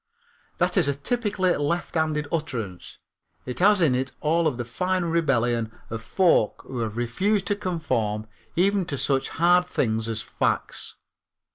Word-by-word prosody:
That - - +1
is 170 -6 +3
a 140 - +1
typically 195 - 0
lefthanded 155 -1 -1
utterance. 115 - -4 0.5
It 125 - -4
has 200 +1 +5
in 155 -6 +4
it 130 +1 -1
all 165 +2 +2
of 145 - -1
the 120 - -3
fine 185 +8 -1
rebellion 125 -9 +1 0.2
of 115 0 -4
folk 170 - +2
who 130 - -5
have 110 -1 -3
refused 185 - 0
to 205 - +2
conform 140 - -2 0.3
even 195 +2 +3
to 140 - -3
such 135 +1 +1
hard 175 +1 +3
things 110 -8 0
as 110 -1 -2
facts. - - -2
150 Hz, 150 wpm, -25 LUFS, 120-180 Hz, 0.5 s, has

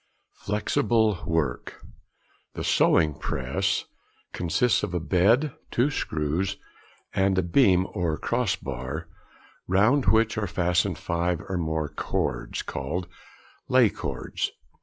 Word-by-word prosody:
Flexible 110 -2 +1
Work.—The 80 -2 -5
"sewing 80 -3 +3
press" - - -1 0.5
consists 90 +8 +1
of 95 -3 -3
a - - +1
bed, 105 - +3 0.2
two 130 +5 +1
screws, 85 - -1 0.6
and 95 0 +2
a 95 - +3
beam 95 -1 +4
or 85 -6 -1
cross 120 -5 0
bar, 65 +5 -5 0.6
round 110 +9 +3
which 110 +2 +3
are 105 - -1
fastened 90 0 +1
five 85 0 -1
or 95 - -2
more 80 -2 -1
cords, 70 -4 -3
called 85 +7 -4 0.6
lay - - +5
cords. - - -3
90 Hz, 110 wpm, -26 LUFS, 80-110 Hz, 0.6 s, lay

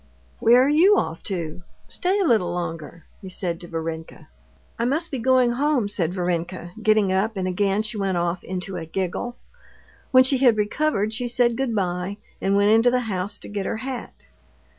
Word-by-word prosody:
"Where 240 +3 +6
are - - +2
you 350 +8 +5
off 160 - -2
to? 170 -4 -4 0.3
Stay 375 +2 0
a - - +2
little 215 - +2
longer," 165 -2 -5 0.2
he 190 - -8
said 175 -2 -3
to 175 - -8
Varenka. 160 -1 -6 0.5
"I 235 - +1
must 305 +7 -1
be 270 - -3
going 255 0 +3
home," 270 -3 +1
said 180 -5 -1
Varenka, 175 0 -3
getting 215 -3 +3
up, 205 +3 0
and 185 -1 -1
again 195 +3 +1
she 220 0 -4
went 190 -2 0
off 175 +1 -1
into 185 0 -5
a 165 - -5
giggle. 190 +7 -3 0.7
When 255 -1 +7
she 260 0 +2
had 245 -4 +5
recovered, 215 0 0
she 245 +2 -2
said 240 -1 +2
good 250 -2 -1
bye, 180 0 -2 0.2
and 195 +1 +1
went 200 +1 +4
into 225 +2 +5
the 250 0 +1
house 200 -4 -3
to - - -7
get 200 -2 -4
her 225 - -2
hat. 255 +1 -6
205 Hz, 190 wpm, -23 LUFS, 180-245 Hz, 0.7 s, When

